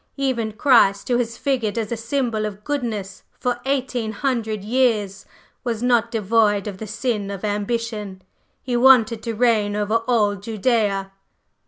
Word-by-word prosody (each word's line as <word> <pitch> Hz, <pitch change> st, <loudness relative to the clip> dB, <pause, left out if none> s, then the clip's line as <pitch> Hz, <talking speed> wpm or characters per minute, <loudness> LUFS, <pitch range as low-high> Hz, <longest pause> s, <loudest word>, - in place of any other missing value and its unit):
Even 245 Hz, -6 st, -1 dB
Christ, 215 Hz, -5 st, +3 dB
who 245 Hz, -, +3 dB
has 235 Hz, -1 st, -2 dB
figured 245 Hz, -6 st, -1 dB
as 225 Hz, -1 st, -2 dB
a -, -, 0 dB
symbol 230 Hz, -2 st, -1 dB
of 210 Hz, 0 st, -9 dB
goodness 220 Hz, -9 st, -3 dB, 0.2 s
for 245 Hz, -1 st, -1 dB
eighteen 255 Hz, -5 st, -1 dB
hundred 220 Hz, -4 st, -2 dB
years, 215 Hz, -4 st, 0 dB, 0.4 s
was 235 Hz, -2 st, -2 dB
not 240 Hz, -2 st, +3 dB
devoid 215 Hz, -2 st, +2 dB
of 200 Hz, -3 st, -6 dB
the 220 Hz, -, -6 dB
sin 220 Hz, -2 st, -2 dB
of 200 Hz, +1 st, -5 dB
ambition: 210 Hz, -2 st, -3 dB, 0.4 s
He 250 Hz, -1 st, -2 dB
wanted 240 Hz, -3 st, +5 dB
to 230 Hz, -1 st, -4 dB
reign 215 Hz, -3 st, +2 dB
over 210 Hz, +2 st, +1 dB
all 210 Hz, -5 st, +2 dB
Judæa." 205 Hz, -2 st, 0 dB
225 Hz, 150 wpm, -22 LUFS, 205-245 Hz, 0.4 s, wanted